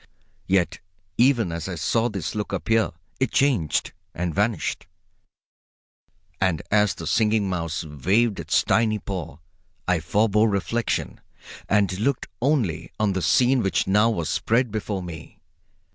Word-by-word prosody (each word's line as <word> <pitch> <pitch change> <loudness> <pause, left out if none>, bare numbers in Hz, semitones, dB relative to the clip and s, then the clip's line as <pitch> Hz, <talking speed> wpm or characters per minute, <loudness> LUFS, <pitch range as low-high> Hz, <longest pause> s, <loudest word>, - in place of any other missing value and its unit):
Yet 90 -2 +1 0.4
even 120 -7 +3
as 85 +2 -4
I 90 - -4
saw 110 +9 +1
this 95 -7 -4
look 105 -1 -3
appear 110 -1 +1 0.3
it 130 - +1
changed 125 - +1 0.2
and 85 -1 -2
vanished. 105 +4 -1 1.5
And 95 -5 0
as 105 -1 +3
the - - -7
Singing 110 -2 +2
Mouse 85 -3 -3
waved 95 - +1
its - - +1
tiny 110 -2 +2
paw 90 -7 -6 0.5
I 90 -2 +2
forbore 105 +5 +2
reflection 105 +4 -2 0.5
and 100 -2 +2
looked 130 +4 0 0.2
only 125 - 0
on 105 -2 +2
the 95 - -2
scene 130 +5 +3
which 95 - +1
now 105 +4 +4
was 85 -9 -2
spread 120 +1 +1
before 105 -3 -3
me. 85 -3 -9
100 Hz, 135 wpm, -24 LUFS, 90-115 Hz, 1.5 s, now